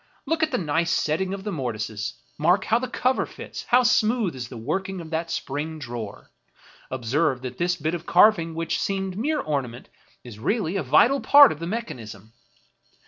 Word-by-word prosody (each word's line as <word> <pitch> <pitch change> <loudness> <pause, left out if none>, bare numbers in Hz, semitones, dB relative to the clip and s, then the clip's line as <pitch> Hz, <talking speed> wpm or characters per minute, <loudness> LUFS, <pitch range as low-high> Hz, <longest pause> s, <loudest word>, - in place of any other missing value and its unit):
Look 325 0 -1
at 315 - +2
the 255 - -1
nice 165 0 0
setting 170 +4 0
of 195 0 -5
the 210 - -3
mortises; 110 - -4 0.2
mark 180 +5 +3
how 230 - +2
the 255 - -3
cover 255 +1 0
fits; - - -9
how 250 +1 +4
smooth 225 - +2
is 125 -2 -6
the 125 - -8
working 190 +11 -3
of 165 -1 -9
that 165 +1 -2
spring 150 +3 -4
drawer. 120 -7 -7 0.6
Observe 130 +2 0
that 125 -1 -6
this 175 +1 +1
bit 155 +1 -2
of 170 -1 -5
carving, 170 -4 +4
which 165 0 -2
seemed 195 -1 -2
mere 290 +8 -1
ornament, 130 -5 -4 0.3
is 115 -4 -11
really 195 - -1
a 195 - 0
vital 190 - +4
part 285 -2 +8
of 150 - -6
the 170 - -4
mechan 225 - -4
ism. 110 0 -11
165 Hz, 190 wpm, -24 LUFS, 130-205 Hz, 0.6 s, part